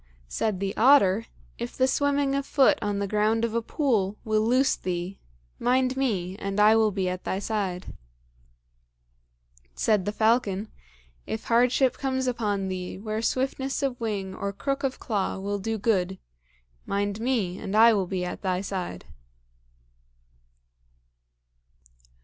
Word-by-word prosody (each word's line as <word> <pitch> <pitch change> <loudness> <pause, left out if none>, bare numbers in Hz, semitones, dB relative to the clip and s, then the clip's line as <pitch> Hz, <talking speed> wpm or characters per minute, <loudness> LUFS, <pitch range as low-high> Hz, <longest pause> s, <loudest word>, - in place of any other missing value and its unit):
Said 200 - -1
the 195 0 -2
otter, 225 -5 +5 0.3
"If 235 0 -5
the 260 - +3
swimming 285 0 +1
of 275 0 0
foot 280 +1 +3
on 205 -1 -1
the 200 0 -1
ground 215 +3 +1
of 225 - -4
a 235 - +1
pool 220 - 0
will 215 -1 +2
loose 250 +5 +3
thee, 180 +1 -4 0.4
mind 255 +1 +2
me, 195 -9 -1
and 195 0 -3
I 210 +1 +6
will 220 -1 +4
be 195 -2 -2
at 180 0 -3
thy 190 - -2
side." 195 -3 -3 1.8
Said 210 - +1
the 205 - -1
falcon, 215 -2 +1 0.6
"If 220 - -4
hardship 250 +2 +2
comes 260 -1 -1
on 205 -5 -1
thee, 185 -1 -4
where 215 +2 -3
swiftness 265 +3 -1
of 255 -3 -2
wing 200 -4 -3
or 200 +1 -3
crook 275 +7 -3
of 265 -1 -1
claw 205 -6 -2
will 200 +1 -3
do 225 +3 -2
good, 190 -3 0 0.7
mind 200 +1 -1
me, 225 -7 -1
and 195 - -4
I 230 +1 +8
will 195 -3 0
be 180 -1 -2
at 180 - -6
thy 185 -2 -1
side." 185 - -5
215 Hz, 145 wpm, -26 LUFS, 195-250 Hz, 1.8 s, I